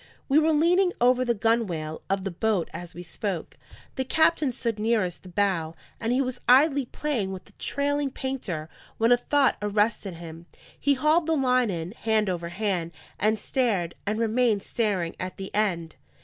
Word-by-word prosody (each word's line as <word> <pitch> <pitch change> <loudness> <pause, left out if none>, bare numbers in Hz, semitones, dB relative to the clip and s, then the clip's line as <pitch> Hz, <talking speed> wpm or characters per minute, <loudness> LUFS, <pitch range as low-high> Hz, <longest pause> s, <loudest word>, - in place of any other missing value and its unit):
We 285 +2 +5
were 315 +1 +3
leaning 355 +4 +3
over 250 +1 +4
the 240 -2 +1
gunwale 200 -9 0
of 195 0 0
the 195 - -3
boat 200 0 0
as 175 -1 -8
we 175 - -7
spoke. 180 +1 -4 0.4
The 260 - +1
captain 315 0 +2
stood 230 -3 -3
nearest 210 -5 0
the 185 - -12
bow, 175 -4 0 0.2
and 230 +1 -1
he 260 +2 +2
was 255 -1 -5
idly 280 +1 +5
playing 240 -8 -2
with 190 -1 -7
the - - -19
trailing 285 0 0
painter, 245 -13 -4 0.3
when 230 +2 +3
a 245 - +7
thought 275 +2 +2
arrested 210 -2 0
him. 165 0 -10 0.3
He 285 -1 +3
hauled 305 +5 +2
the 325 - +2
line 255 -3 +2
in 170 -1 -4
hand 215 -3 0
over 170 -1 -4
hand, 175 -3 -2 0.3
and 215 +2 +2
stared, 210 -8 0
and 215 +2 0
remained 225 -2 +2
staring, 200 -8 -1
at 185 0 -5
the 195 0 -7
end. 175 -6 -1
220 Hz, 175 wpm, -26 LUFS, 185-260 Hz, 0.4 s, a